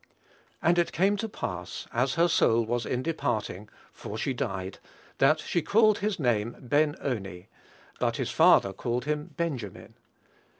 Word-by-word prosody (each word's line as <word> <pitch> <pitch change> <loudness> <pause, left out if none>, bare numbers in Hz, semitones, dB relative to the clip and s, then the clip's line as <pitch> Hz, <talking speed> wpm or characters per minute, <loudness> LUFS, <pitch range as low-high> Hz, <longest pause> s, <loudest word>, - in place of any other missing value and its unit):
"And 175 +1 +4
it 170 - +1
came 195 +4 +2
to 225 +2 -3
pass, 90 - -5
as 125 +3 +1
her 170 +1 +4
soul 115 -8 +3
was 120 0 -2
in 125 0 -1
departing 110 - -2 0.2
(for 105 - -7
she 135 +4 -1
died), 95 -8 -4 0.4
that - - +4
she 170 - -1
called 215 +5 +4
his 205 -1 -1
name 120 -4 0
Ben 145 +3 +1
oni: 95 -8 -4 0.5
but - - 0
his - - -2
father 95 - +5
called 120 +5 -3
him 150 +2 -3
Benjamin." 135 - -4
125 Hz, 155 wpm, -28 LUFS, 110-165 Hz, 0.5 s, father